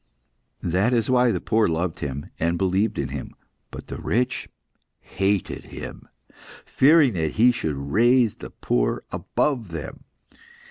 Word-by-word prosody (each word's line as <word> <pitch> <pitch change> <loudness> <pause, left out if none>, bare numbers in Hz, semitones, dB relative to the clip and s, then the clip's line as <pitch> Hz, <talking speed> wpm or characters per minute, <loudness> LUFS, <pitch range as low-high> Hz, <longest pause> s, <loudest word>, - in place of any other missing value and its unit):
"That 95 +8 +1
is 115 0 +1
why 125 -1 +4
the - - -1
poor 110 -1 +2
loved 80 +1 -2
Him, 70 0 -5
and 85 +1 +1
believed 95 +4 +1
in 65 - -2
Him. 70 -1 -7 0.3
But - - -9
the - - -7
rich 125 +3 -1 0.5
hated 100 0 -2
Him; - - -9 0.6
fearing 145 -2 +5
that 80 -4 -1
He 120 +3 +5
should 80 -11 -3
raise 115 - +3
the - - -10
poor - - -1
above 125 -9 -1
them. 80 -3 -7
100 Hz, 140 wpm, -24 LUFS, 80-120 Hz, 0.6 s, fearing